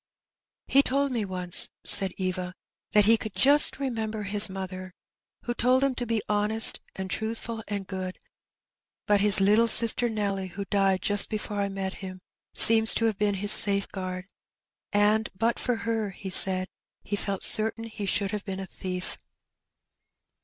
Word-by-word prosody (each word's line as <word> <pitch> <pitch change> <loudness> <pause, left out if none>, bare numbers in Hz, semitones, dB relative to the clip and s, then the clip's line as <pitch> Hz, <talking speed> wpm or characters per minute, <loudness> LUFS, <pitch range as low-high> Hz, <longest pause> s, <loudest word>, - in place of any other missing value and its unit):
"He 275 - +3
told 280 +1 -2
me 230 -4 -3
once/' 180 -2 0
said 190 -2 +2
Eva, 185 -1 -5 0.4
"that 210 -1 +3
he 225 +2 +3
could 220 -2 -9
just 290 +2 +3
remember 225 -5 -5
his 205 +1 +4
mother, 185 -1 -9 0.5
who 240 - -4
told 255 +2 0
him 275 -1 0
to 245 -1 -6
be 225 -2 -3
honesty 210 +1 +4 0.2
and 190 0 -7
truthful, 225 +2 -6
and 200 -1 -6
good; 185 -1 -7 0.9
but 205 -1 +1
his 205 -1 +5
little 210 +4 +2
sister 230 +1 +2
Nelly, 200 -3 -4
who 200 +2 -8
died 195 -2 -1
just 205 -1 +3
before 210 -1 -6
I 200 - -3
met 195 -1 -6
him^ 185 -1 -9 0.4
seems 225 0 +8
to 230 - -1
have 220 -2 -2
been 205 -1 -1
his 205 +2 +1
safeguard, 190 -3 -2 0.7
and 210 +1 0
but 230 +4 -2
for 245 - -2
her 225 -2 -4
he 190 0 -10
said 185 0 +6 0.4
he 205 - -5
felt 200 -1 -5
certain 220 +1 +5
he 215 -3 -8
should 200 0 -2
have 210 -2 -6
been 190 -1 -7
a 195 - -7
thief.' 185 -1 -7
205 Hz, 165 wpm, -25 LUFS, 190-225 Hz, 0.9 s, seems